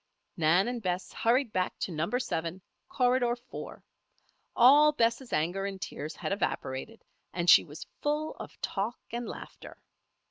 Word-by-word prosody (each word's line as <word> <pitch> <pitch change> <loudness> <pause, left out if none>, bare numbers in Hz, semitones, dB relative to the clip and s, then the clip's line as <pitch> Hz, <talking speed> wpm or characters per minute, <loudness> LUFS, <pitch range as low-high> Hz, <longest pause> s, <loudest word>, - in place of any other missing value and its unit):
Nan 175 +4 +3
and 245 -1 -3
Bess 180 -2 -3
hurried 235 0 +1
back 185 0 -1
to - - -3
Number 170 +9 -1
Seven, 170 -7 -3 0.3
Corridor 245 -1 +2
Four. 245 +1 -10 0.7
All 290 +5 +7
Bess' 235 -1 0
anger 175 +6 0
and 195 -1 -6
tears 155 -3 -6
had - - -4
evaporated, 195 +1 -3 0.3
and 175 -1 -2
she - - +9
was 150 -1 -10 0.2
full 300 +1 -1
of - - -10
talk 210 +4 -2
and 240 +1 -4
laughter. - - -10
215 Hz, 145 wpm, -29 LUFS, 175-245 Hz, 0.7 s, she